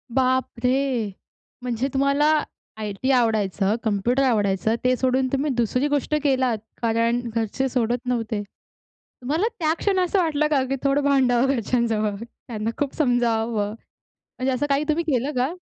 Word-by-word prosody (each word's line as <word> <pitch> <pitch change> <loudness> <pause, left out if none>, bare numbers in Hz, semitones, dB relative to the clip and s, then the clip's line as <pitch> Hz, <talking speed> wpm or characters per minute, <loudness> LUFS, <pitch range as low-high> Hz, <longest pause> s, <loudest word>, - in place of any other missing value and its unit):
बापरे! 255 -2 +1 0.5
म्हणजे 250 +2 -1
तुम्हाला 280 +2 +2 0.5
आय-टी 215 +5 -2
आवडायचं, 215 -4 +2
कंम्प्युटर 230 +5 +1
आवडायचं, 210 -3 +1
ते 255 0 +3
सोडून 260 +1 +1
तुम्ही 280 +1 +1
दुसरी 250 +5 +1
गोष्ट 290 +1 0
केलात, 260 -5 +2 0.2
कारण 230 +1 +1
घरचे 230 +4 -1
सोडत 240 -1 0
नव्हते. 225 -4 -1 0.8
तुम्हाला 315 - 0
त्या 315 -1 +2
क्षण 390 -2 +1
असं 365 +2 +1
वाटलं 305 -3 +1
का 270 -3 +3
की 270 - +1
थोडं 275 +1 +2
भांडावं 265 -3 +3
घरच्यांजवळ, 225 -3 0
त्यांना 225 -2 -6
खूप 285 -2 -2
समजवावं. 230 -6 +1 0.7
म्हणजे 260 +1 0
असं 290 +3 0
काही 280 +2 +2
तुम्ही 330 +2 +1
केलं 260 +3 0
का? 260 +7 +1
250 Hz, 140 wpm, -23 LUFS, 225-275 Hz, 0.8 s, ते